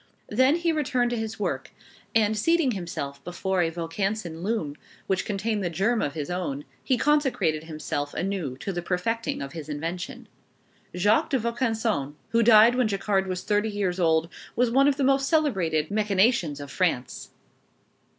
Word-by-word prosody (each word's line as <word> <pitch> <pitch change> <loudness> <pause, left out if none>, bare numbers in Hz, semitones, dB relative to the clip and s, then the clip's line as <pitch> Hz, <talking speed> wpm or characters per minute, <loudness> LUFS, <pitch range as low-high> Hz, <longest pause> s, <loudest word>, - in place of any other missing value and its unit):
Then 260 +7 +4
he 340 0 +1
returned 255 -6 0
to - - 0
his 220 -1 -4
work, - - -2 0.5
and 220 -1 +3
seating 325 +5 +2
himself 145 -8 -5
before 185 +1 -1
a 165 - +2
Vaucanson 170 +1 -3
loom, 180 -8 -2 0.3
which 190 -1 0
contained 210 +1 -1
the 175 - 0
germ 200 +8 +1
of 145 - -2
his 150 +1 -4
own, 155 -6 -3 0.2
he 255 - +2
consecrated 265 - +1
himself 155 -2 -4
anew 175 -8 -2
to 195 - -3
the 175 - -2
perfecting 190 +3 -2
of 140 - -8
his 155 -2 -7
invention. 165 +4 -5 0.7
Jacques 205 +5 +3
de 270 - +2
Vaucanson, 225 - -1
who 230 - +3
died 225 +1 +7
when 250 -2 +2
Jacquard 195 -1 0
was 185 -1 -3
thirty 210 +1 +1
years 195 -3 -1
old, 160 -1 +3 0.3
was 245 -1 +2
one 270 +3 +5
of 285 -1 +2
the 280 - 0
most 270 0 +3
celebrated 185 - +1
mechanicians 205 - +2
of 145 -1 -8
France. 165 -9 -1
195 Hz, 165 wpm, -26 LUFS, 165-230 Hz, 0.7 s, died